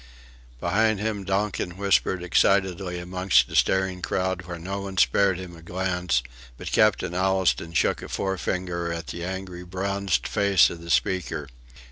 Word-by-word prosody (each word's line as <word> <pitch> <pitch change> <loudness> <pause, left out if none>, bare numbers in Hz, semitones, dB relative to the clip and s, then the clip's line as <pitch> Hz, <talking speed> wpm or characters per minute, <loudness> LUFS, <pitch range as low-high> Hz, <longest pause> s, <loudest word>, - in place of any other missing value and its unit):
Behind 110 - +2
him 105 -1 -2
Donkin 95 -2 -2
whispered 95 -2 +1
excitedly 95 0 +2
amongst 90 -7 +2
a - - -5
staring 95 -1 +2
crowd 90 -1 -2
where 85 -1 -5
no 95 +4 -5
one 95 -1 -7
spared 95 0 +3
him 90 -2 -8
a 80 - -13
glance, 90 -5 -1 0.3
but - - -6
Captain 105 -5 +3
Allistoun 95 -2 +1
shook - - +1
a - - -8
forefinger 90 -2 -2
at 85 -1 -4
the 85 +3 -5
angry 95 -1 -5
bronzed 95 +1 -1
face 100 -3 +4
of 85 - -8
the 85 - -10
speaker. 90 -6 0
95 Hz, 150 wpm, -25 LUFS, 90-95 Hz, 0.3 s, face